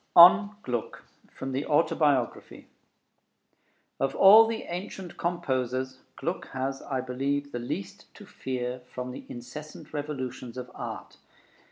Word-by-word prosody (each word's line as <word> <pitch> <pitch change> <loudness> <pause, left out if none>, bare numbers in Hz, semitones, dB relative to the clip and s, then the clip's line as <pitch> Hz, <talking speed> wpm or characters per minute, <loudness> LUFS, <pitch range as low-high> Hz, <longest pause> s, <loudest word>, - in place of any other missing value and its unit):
ON 200 +4 +9
GLUCK 120 -3 -3 0.3
From 135 - -5
the 135 +2 -1
Autobiography 145 - +1 1.3
Of 135 - 0
all 215 +4 +9
the 225 0 -3
ancient 180 +1 -6
composers, 130 -6 -1 0.2
Gluck - - -3
has, 135 +1 -2
I 130 -2 -2
believe, 140 +3 -2
the 120 - -3
least 120 -4 -6
to - - -12
fear 125 -1 -4
from 125 0 -5
the - - -9
incessant 125 +7 -9
revolutions 130 -4 -5
of 125 0 -6
art. - - -7
135 Hz, 125 wpm, -28 LUFS, 125-155 Hz, 1.3 s, ON